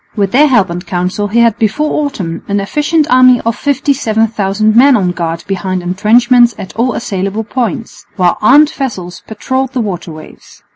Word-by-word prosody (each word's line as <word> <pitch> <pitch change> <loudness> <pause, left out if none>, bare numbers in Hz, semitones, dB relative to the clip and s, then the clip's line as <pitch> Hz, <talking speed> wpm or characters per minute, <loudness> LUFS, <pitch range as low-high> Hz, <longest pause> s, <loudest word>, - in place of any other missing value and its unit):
With 200 -3 -1
their 295 +4 +4
help 220 -10 +2
and 175 +1 -5
counsel 180 +3 -3
he 230 +3 +1
had 230 -1 +2
before 300 +8 0
autumn 180 - -5
an 200 0 -1
efficient 295 +9 0
army 255 -1 +5
of 230 0 -2
57,000 220 -7 0
men 260 +2 +5
on 185 -3 0
guard 165 -2 -4
behind 185 -1 -3
entrenchments 235 +6 +3
at 190 - -9
all 240 +2 0
assailable 200 -1 -3
points, 235 +1 -5
while 180 -3 +1
armed 290 +7 +5
vessels 190 -10 -6
patrolled 260 +4 -3
the 255 - -2
waterways. 170 -6 -9
220 Hz, 160 wpm, -12 LUFS, 190-255 Hz, -, army